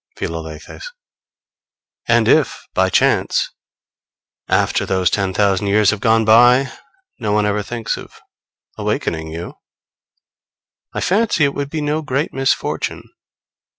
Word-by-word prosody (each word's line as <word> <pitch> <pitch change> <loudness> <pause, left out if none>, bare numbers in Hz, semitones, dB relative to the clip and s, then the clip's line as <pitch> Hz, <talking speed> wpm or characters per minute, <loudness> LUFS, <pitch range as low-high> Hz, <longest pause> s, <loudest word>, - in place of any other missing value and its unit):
Philalethes. 80 - -7 1.2
And - - +3
if - - +2
by - - +2
chance, - - +1 1.0
after - - +1
those 95 -1 +1
ten 100 -2 0
thousand 100 0 +1
years 100 0 +4
have 105 - -3
gone 110 0 +3
by, 120 +4 +5 0.5
no 105 -4 -1
one 105 0 +2
ever 105 0 0
thinks 115 +2 -4
of - - -12 0.6
awakening 80 -1 -2
you, 85 +2 -8 1.3
I - - -4
fancy 200 -4 +2
it 140 -1 +2
would 140 -1 -4
be 155 0 -3
no 150 +1 -1
great 145 0 -2
misfortune. 135 0 -1
110 Hz, 120 wpm, -18 LUFS, 95-140 Hz, 1.3 s, by